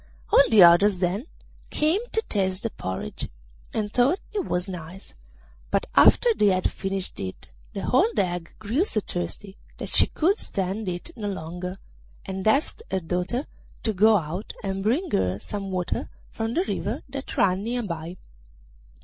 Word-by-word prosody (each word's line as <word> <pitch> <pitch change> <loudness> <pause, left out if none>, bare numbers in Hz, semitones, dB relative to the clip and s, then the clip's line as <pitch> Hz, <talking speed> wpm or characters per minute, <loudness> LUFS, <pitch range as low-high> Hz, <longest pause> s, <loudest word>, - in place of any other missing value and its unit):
All - - +9
the 215 -5 +8
others 180 +3 +7
then 190 - -1 0.4
came 315 +7 +2
to 445 - 0
taste 190 - -1
the 230 - -1
porridge, 95 -6 -5 0.4
and 210 -1 -2
thought 255 +9 +4 0.2
it 200 - -1
nice, 180 +1 -8 0.6
but - - +1
after 480 -2 +6
they 210 - +3
had 185 -2 +2
finished 195 -1 -3
it 95 -1 -7 0.2
the - - -4
old 395 - +3
hag 175 -2 -1
grew 225 - 0
so 230 - 0
thirsty 190 - -5 0.2
that - - -4
she - - +6
could 380 +7 +1
stand 195 +2 -1
it 175 - -5
no 210 -2 -4
longer, 180 0 -5 0.5
and 190 +1 -3
asked 280 - +2
her 190 - 0
daughter 180 - -2 0.4
to 220 - 0
go 215 +3 +5
out 175 +4 -4
and 195 -1 -2
bring 250 - 0
her 95 0 +1
some 195 - -5
water 180 -2 -2 0.2
from 225 +1 -3
the 355 - +3
river - - -3
that 275 0 -6
ran 185 -1 +3
near 240 +2 -1
by. 170 -2 -5
195 Hz, 160 wpm, -25 LUFS, 180-230 Hz, 0.6 s, All